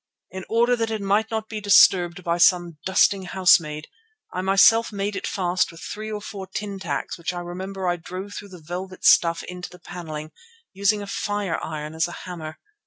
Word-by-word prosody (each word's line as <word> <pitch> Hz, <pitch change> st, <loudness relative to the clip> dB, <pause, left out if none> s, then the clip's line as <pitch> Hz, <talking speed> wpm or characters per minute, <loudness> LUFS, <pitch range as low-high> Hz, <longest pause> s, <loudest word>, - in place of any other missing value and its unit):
In 190 Hz, 0 st, -7 dB
order 235 Hz, +2 st, +3 dB
that 225 Hz, -1 st, -1 dB
it 220 Hz, -1 st, -2 dB
might 205 Hz, +2 st, +1 dB
not 220 Hz, -1 st, -3 dB
be 215 Hz, -1 st, -5 dB
disturbed 180 Hz, -3 st, +5 dB
by 170 Hz, 0 st, 0 dB
some 175 Hz, -3 st, +3 dB
dusting 190 Hz, 0 st, +3 dB
housemaid, 165 Hz, -5 st, +3 dB, 0.5 s
I 185 Hz, -, -2 dB
myself 195 Hz, +5 st, +5 dB
made 200 Hz, 0 st, -3 dB
it -, -, -3 dB
fast 185 Hz, -2 st, 0 dB
with 165 Hz, -, -13 dB
three 215 Hz, +1 st, -6 dB
or 210 Hz, -1 st, -5 dB
four 195 Hz, -3 st, -7 dB
tin 200 Hz, +1 st, -5 dB
tacks 165 Hz, -3 st, -4 dB
which 175 Hz, +1 st, -3 dB
I -, -, -3 dB
remember 185 Hz, +2 st, -5 dB
I 175 Hz, 0 st, +1 dB
drove 185 Hz, +4 st, -7 dB
through 205 Hz, -1 st, -8 dB
the 180 Hz, -4 st, -13 dB
velvet 185 Hz, +2 st, -6 dB
stuff 170 Hz, -1 st, +5 dB
into 180 Hz, 0 st, -7 dB
the 180 Hz, -, -14 dB
panelling, 155 Hz, -3 st, -7 dB, 0.4 s
using 200 Hz, +1 st, +1 dB
a -, -, -6 dB
fireiron 165 Hz, -7 st, -3 dB
as 160 Hz, +1 st, 0 dB
a 175 Hz, -, -8 dB
hammer. 160 Hz, -4 st, -7 dB
185 Hz, 190 wpm, -24 LUFS, 175-205 Hz, 0.5 s, disturbed